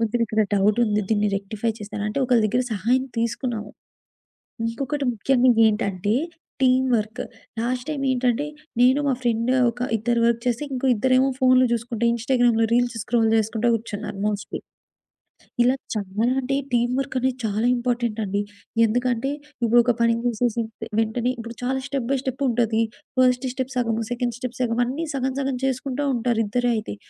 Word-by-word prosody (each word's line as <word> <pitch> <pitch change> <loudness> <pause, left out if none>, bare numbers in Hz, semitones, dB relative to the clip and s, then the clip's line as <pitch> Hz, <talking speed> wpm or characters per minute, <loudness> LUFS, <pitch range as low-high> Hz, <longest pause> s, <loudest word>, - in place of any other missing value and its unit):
కొంచెమిక్కడ 225 -1 0 0.2
డౌటుంది, 210 +1 +2
దీన్ని 210 -1 +2
రెక్టిఫై 215 +3 -3
చేస్తారా?" 205 0 -5
అంటే, 275 +6 -2
ఒకళ్ళ 240 -3 +3
దగ్గర 245 +4 0
సహాయం 250 +6 +1
తీసుకున్నాము. 230 -2 -2 1.0
ఇంకొకటి 275 +4 -3
ముఖ్యంగా 250 +2 +3
ఏంటంటే, 205 -1 0 0.5
టీమ్ 260 0 +4
వర్క్. 220 +3 -3 0.4
లాస్ట్ 245 +2 -2
టైమేంటంటే, 265 -2 0 0.4
నేను 260 +3 +5
మా 270 - +3
ఫ్రెండ్, 235 0 0 0.2
ఒక 235 - -8 0.2
ఇద్దరు 235 +2 0
వర్క్ 235 0 +2
చేసి, 245 +3 0
ఇంకో 260 +1 -2
ఇద్దరేమో 255 +4 +3
ఫోన్లు 255 -1 +5
జూసుకుంట, 235 0 -2
ఇన్‌స్టాగ్రామ్‌లో 235 -1 +2
రీల్స్ 240 -1 +2
స్క్రోల్ 230 0 +1
చేసుకుంటా 220 +2 +1
కూర్చున్నారు 210 -2 -4
మోస్ట్‌లీ. 210 -1 -3 1.0
ఇలా 255 +2 +3 0.2
చాలా 210 +3 -1
అంటే 275 +2 -1 0.2
టీమ్ 240 +1 +2
వర్కనేది 260 0 -1
చాలా 215 +2 0
ఇంపార్టెంటండి. 235 -5 -1 0.4
ఎందుకంటే, 245 +3 0 0.3
ఇప్పుడు 235 +1 +5
ఒక 245 - +3
పని 230 0 +4
జేసేసి 235 0 0 0.2
తె - - -5
వెంటనే 235 +3 0
ఇప్పుడు 230 0 -7
చాలా 265 +1 0
స్టెప్ 270 -3 -2
బై - - +2
స్టెప్పుంటది. 240 -4 0 0.4
ఫస్ట్ 250 0 +3
స్టెప్ 260 0 -4
సగము, 230 -2 0
సెకండ్ 245 -1 -1
స్టెప్ 255 -1 -5
సగము, 235 0 +1
అన్నీ 300 +7 -3
సగం 260 0 -1
సగం 270 -1 -1
చేసుకుంటా 265 +2 -2
ఉంటారు 235 -1 0
ఇద్దరే 245 +3 +1
అయితే. 105 - -5
240 Hz, 145 wpm, -23 LUFS, 225-255 Hz, 1.0 s, నేను